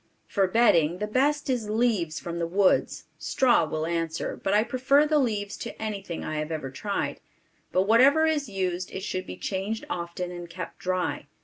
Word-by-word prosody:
For 195 -2 +1
bedding, 180 -6 +4
the 210 - -2
best 285 +7 +1
is 245 -5 -1
leaves 215 -8 +1
from 170 0 -5
the 170 - -1
woods; 190 +2 +2 0.2
straw 255 - +3
will 155 0 -2
answer, 165 -1 -2
but 195 - -2
I 210 +1 +4
prefer 265 +4 +3
the 305 0 +3
leaves 205 -6 -1
to 235 - -7
anything 200 -6 -4
I 155 0 -2
have 155 +1 -4
ever 150 -4 -4
tried, 200 +9 -3 0.5
but 185 - +3
whatever 265 +9 +5
is 300 -6 0
used 185 -2 -2
it 190 - -6
should 185 -2 -3
be - - -7
changed 200 +3 -3
often 175 +1 -4
and 175 -1 -8
kept 180 +2 -7
dry. 185 -5 -2
195 Hz, 185 wpm, -26 LUFS, 170-235 Hz, 0.5 s, whatever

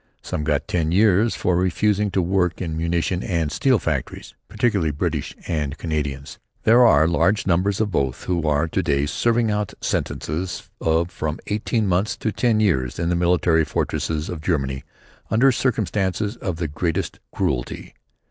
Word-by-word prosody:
Some 75 - -3
got 75 -2 0
ten 80 -2 0
years 105 +3 +3
for 90 - 0
refusing 100 +3 +1
to 95 -1 0
work 90 -1 0
in 80 -3 -3
munition 85 +2 -1
and 85 -6 -1
steel 130 - +3
factories, 75 - -4
particularly 105 -7 +1
British 75 - -2
and 75 -3 -2
Canadians. 75 -4 -4 0.2
There 120 +3 +6
are 80 -7 +5
large 85 +5 +2
numbers 95 +2 +1
of 110 -2 0
both 65 -7 -1
who 85 -3 -1
are 75 +1 +2
to - - -1
day 70 -3 +1
serving 115 +7 +1
out 105 -1 -2
sentences 90 +5 -3
of 80 +2 +1
from 80 0 -3
eighteen 110 +1 -1
months 95 +3 0
to 110 - -2
ten 115 0 +1
years 65 - +1
in 85 0 -1
the 90 - +1
military 85 -2 +3
fortresses 75 0 -2
of 85 -3 -5
Germany 70 -5 -1 0.5
under 125 +5 +4
circumstances 105 -4 -1
of 95 -7 -3
the 85 0 -2
greatest 85 +5 -2
cruelty. - - -3
85 Hz, 160 wpm, -22 LUFS, 80-105 Hz, 0.5 s, There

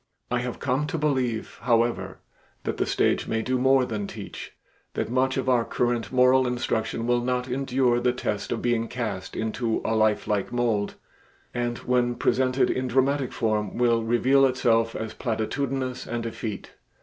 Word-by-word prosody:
I 125 - +2
have 120 0 -4
come 135 +2 0
to 165 - -2
believe, 130 -7 -1
however, 120 0 +1 0.5
that - - -2
the - - 0
stage - - +1
may 110 0 -1
do 130 +1 0
more 130 0 +4
than 105 -4 -3
teach, - - -8 0.4
that - - -2
much 130 +1 +1
of 130 - -2
our 125 -2 +4
current 120 0 -1
moral 130 0 +4
instruction 115 -2 -1
will 120 0 +2
not 125 +1 -1
endure 130 -1 +1
the 125 0 +2
test 105 -4 -3
of 115 - -2
being 120 -1 +1
cast 105 -7 -4
into 110 +1 -1
a 115 - +1
lifelike 105 -2 +1
mold, 115 -4 0 0.6
and 120 -1 -1
when 125 -1 +1
presented 130 +1 +2
in 130 0 -1
dramatic 135 +2 +1
form 105 -3 -1
will 120 -1 +3
reveal 125 +4 +3
itself 115 -3 +2
as 110 -1 -4
platitudinous 130 +3 -2
and 120 0 -3
effete. 110 -2 -5
120 Hz, 160 wpm, -25 LUFS, 115-130 Hz, 0.6 s, more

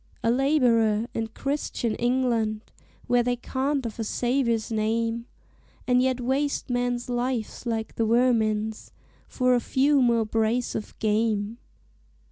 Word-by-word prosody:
"A 230 - +3
laborer 235 -5 +3
in 225 0 -2
Christian 245 -2 -2
England, 235 -3 0 0.4
Where 245 0 +3
they 245 +1 0
cant 265 +2 -2
of 230 0 -6
a - - 0
Saviour's 235 -1 0
name, 225 +2 -1 0.6
And 250 0 +3
yet 260 0 +1
waste 265 +2 -1
men's 245 0 -1
lives 245 -1 -3
like 225 -1 -2
the 225 - 0
vermin's 220 -2 +1 0.3
For 255 -1 +1
a 245 - +4
few 275 +4 +2
more 235 -2 +3
brace 225 +3 0
of 215 - -6
game. 215 0 0
235 Hz, 130 wpm, -26 LUFS, 225-255 Hz, 0.6 s, a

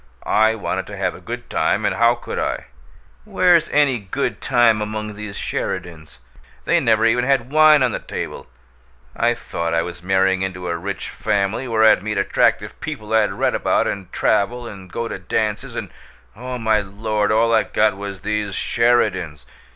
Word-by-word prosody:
I 110 +1 +3
wanted 110 - -3
to - - -8
have - - -1
a - - -12
good - - -7
time - - 0
and - - +1
how 120 +1 +3
could 120 - -6
I? - - -2 0.6
Where's 175 - +3
any 140 -5 +2
good 105 +8 -3
time 120 -4 +3
among 105 0 -4
these 105 -1 -8
Sheridans? 80 -10 -5 0.5
They - - +3
never 110 0 +2
even 120 +2 +3
had 130 -1 +1
wine 155 -2 +6
on 125 - +2
the - - -3
table! - - -6 0.7
I 120 +1 +2
thought 85 -7 -3
I 85 - +2
was 85 0 -8
marrying 95 0 +2
into 90 -2 -4
a 85 - -1
rich 95 +3 -5
family 100 +6 -1
where 110 -2 +3
I'd 110 - +5
meet 105 +1 -3
attractive 100 - +1
people 110 0 -6
I'd 110 -3 +3
read - - 0
about, - - +1
and 95 -3 -4
travel, 120 +4 0
and 95 -4 -11
go 115 - -3
to 95 - -6
dances 105 +3 -2
and, - - -5 0.4
oh, 125 +3 -6
my 110 -2 +2
Lord! 105 +1 -1
all 115 +1 +3
I 110 - +5
got 105 -2 +1
was 100 -1 -7
these 105 -2 -2
Sheridans! 100 - +1
105 Hz, 180 wpm, -20 LUFS, 95-115 Hz, 0.7 s, wine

